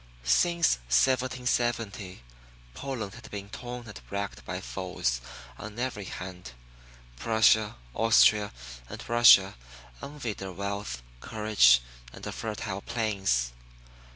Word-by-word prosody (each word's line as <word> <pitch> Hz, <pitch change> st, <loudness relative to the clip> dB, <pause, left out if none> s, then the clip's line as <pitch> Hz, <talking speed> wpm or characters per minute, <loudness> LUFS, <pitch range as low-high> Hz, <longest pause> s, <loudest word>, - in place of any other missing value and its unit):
Since 170 Hz, -, +3 dB
1770, 120 Hz, -, 0 dB, 0.5 s
Poland 120 Hz, -, -5 dB
had 120 Hz, 0 st, -12 dB
been 100 Hz, -1 st, -7 dB
torn 120 Hz, 0 st, -7 dB
and 105 Hz, -, -10 dB
racked 100 Hz, 0 st, -4 dB
by -, -, -4 dB
foes -, -, -2 dB, 0.4 s
on 110 Hz, +1 st, -8 dB
every 120 Hz, -5 st, -3 dB
hand. 90 Hz, -8 st, -8 dB, 0.6 s
Prussia, 110 Hz, -, +3 dB, 0.2 s
Austria 110 Hz, -, +4 dB, 0.4 s
and -, -, -8 dB
Russia 115 Hz, -5 st, +7 dB, 0.5 s
envied 140 Hz, -7 st, -5 dB
her 95 Hz, -1 st, -5 dB
wealth, 100 Hz, -11 st, -4 dB, 0.2 s
courage, 105 Hz, -, +4 dB, 0.3 s
and -, -, -10 dB
her -, -, -4 dB
fertile 105 Hz, -3 st, -4 dB
plains. 95 Hz, -, 0 dB
105 Hz, 105 wpm, -28 LUFS, 95-120 Hz, 0.6 s, Russia